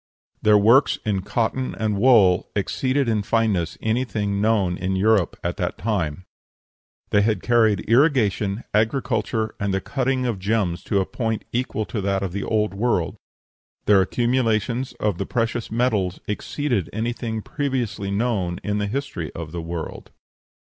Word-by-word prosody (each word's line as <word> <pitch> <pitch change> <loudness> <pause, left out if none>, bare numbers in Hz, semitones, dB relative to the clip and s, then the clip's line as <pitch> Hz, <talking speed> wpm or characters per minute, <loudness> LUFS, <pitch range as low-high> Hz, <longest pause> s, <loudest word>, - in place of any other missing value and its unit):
Their 105 -1 +5
works 115 +7 +5
in 100 -3 0
cotton 120 +6 -1
and 110 -2 -1
wool 100 -5 +4
exceeded 130 +7 0
in 110 -2 +1
fineness 100 -6 0
anything 110 -3 -1
known 105 -5 +2
in 95 +2 -2
Europe 100 -1 +2
at - - -2
that - - -2
time. 90 -6 -2 0.9
They 105 - +4
had 110 +1 0
carried 110 -4 +3
irrigation, 115 -5 +2
agriculture, 110 -1 0
and 100 0 -1
the 95 - +1
cutting 130 +2 -1
of 115 -6 -1
gems 95 -3 0
to 100 -3 +1
a - - -1
point 110 -1 -3
equal 120 -3 -1
to 105 - -4
that 95 0 0
of 95 - -2
the 100 +2 -3
Old 105 -2 0
World. 100 -5 0 0.7
Their 100 -2 +6
accumulations 120 +2 0
of 105 -5 -2
the 100 - -2
precious 115 -1 -1
metals 110 -6 0
exceeded 120 - -2
anything 110 0 -3
previously 130 -8 -2
known 100 -4 -1
in 105 0 -1
the 105 - -1
history 120 - -4
of 80 -2 -7
the 85 - -4
world. 85 -1 -6
110 Hz, 150 wpm, -23 LUFS, 100-120 Hz, 0.9 s, Their